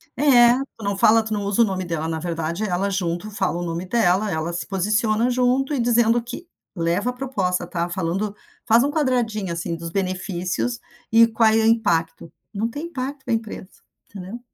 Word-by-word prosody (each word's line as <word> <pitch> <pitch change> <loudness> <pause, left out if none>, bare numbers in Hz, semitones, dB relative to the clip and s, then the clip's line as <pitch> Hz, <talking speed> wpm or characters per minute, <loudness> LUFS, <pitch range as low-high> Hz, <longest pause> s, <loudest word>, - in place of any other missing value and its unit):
É, 245 -4 +6 0.2
tu 225 - -10
não 200 0 0
fala, 220 +3 +5
tu 220 0 -4
não 205 - -1
usa 200 +3 +2
o - - +4
nome 190 -2 -3
dela. 165 -2 -3
Na 160 -1 -2
verdade, 170 +2 -3
ela, 195 0 0
junto, 185 +2 -2
fala 190 -4 -1
o - - -3
nome 170 +1 -3
dela. 195 0 +1
Ela 160 +2 -2
se 170 -2 -4
posiciona 215 +4 +1
junto 255 +3 +1
e 275 - 0
dizendo 235 0 +3
que 255 +9 -9 0.3
leva 175 +7 0
a - - -3
proposta, 200 -9 -2
tá 170 0 -3
falando 190 +4 -2 0.3
faz 230 +2 +4
um 285 - 0
quadradinho, 240 - 0
assim, 170 0 -3
dos 165 0 -6
benefícios 180 - -2 0.3
e 230 +1 +7
qual 225 -1 +3
é 220 - +2
o - - +2
impacto. 170 -8 +1 0.2
Não 220 +3 -1
tem 295 +7 -6
impacto 275 -3 -5
na - - -1
empresa, 220 -4 -4 0.4
entendeu? 195 +4 -8
205 Hz, 195 wpm, -22 LUFS, 175-235 Hz, 0.4 s, e